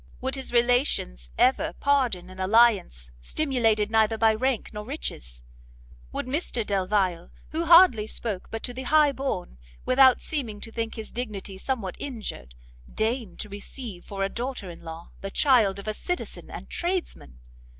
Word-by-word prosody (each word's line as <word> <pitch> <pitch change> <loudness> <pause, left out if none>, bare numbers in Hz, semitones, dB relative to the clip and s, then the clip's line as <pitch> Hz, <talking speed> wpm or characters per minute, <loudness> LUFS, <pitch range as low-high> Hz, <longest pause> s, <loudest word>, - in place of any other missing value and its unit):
Would 260 +1 -2
his 270 -1 -3
relations 240 - +2
ever 260 - +3
pardon 245 -11 +1
an 185 - -12
alliance 190 - +3
stimulated 225 - +1
neither 220 0 +3
by 220 0 +4
rank 255 +1 -1
nor 210 0 -5
riches? 65 - -5 0.7
would - - -3
Mr 255 -4 -2
Delvile, 190 -3 0 0.2
who 330 +2 -1
hardly 335 -10 +7
ever - - -10
spoke 210 -4 -3
but 225 - -5
to 245 - -3
the 255 - -5
high 300 -2 +5
born, 265 - -4 0.3
without 260 0 +6
seeming 240 -9 -3
to 225 - -7
think 225 -1 -3
his 220 -1 -6
dignity 205 -5 -5
somewhat 215 -7 -3
injured, 210 - -6 0.4
deign 225 -1 -1
to 210 - -5
receive 205 -1 -8
for 195 -1 -4
a - - +2
daughter 240 -6 -5
in 170 - -12
law 165 0 -9
the 195 - -4
child 225 -5 +3
of 200 - -8
a 215 - 0
citizen 360 +11 -4
and - - -8
tradesman? 345 - -3
225 Hz, 160 wpm, -26 LUFS, 195-260 Hz, 0.7 s, hardly